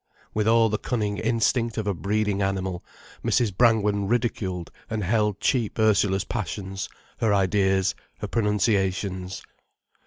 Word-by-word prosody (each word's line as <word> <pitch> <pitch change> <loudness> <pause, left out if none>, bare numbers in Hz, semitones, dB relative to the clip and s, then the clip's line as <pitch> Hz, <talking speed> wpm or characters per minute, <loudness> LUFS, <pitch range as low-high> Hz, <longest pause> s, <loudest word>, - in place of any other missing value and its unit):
With 105 0 0
all 115 0 +5
the 105 -1 -1
cunning 105 -4 -2
instinct 115 +1 +1
of 110 - -1
a 100 - +1
breeding 100 +2 0
animal, 95 -2 -2 0.4
Mrs. 110 -6 +1
Brangwen 105 -3 +3
ridiculed 100 -6 -1 0.2
and 110 -2 -2
held 105 +1 +1
cheap 120 -6 0
Ursula's 100 -3 +3
passions, 95 -2 -4 0.3
her 110 - +2
ideas, 95 -1 +2 0.2
her - - -4
pronunciations. 95 -3 0
105 Hz, 125 wpm, -25 LUFS, 95-110 Hz, 0.4 s, all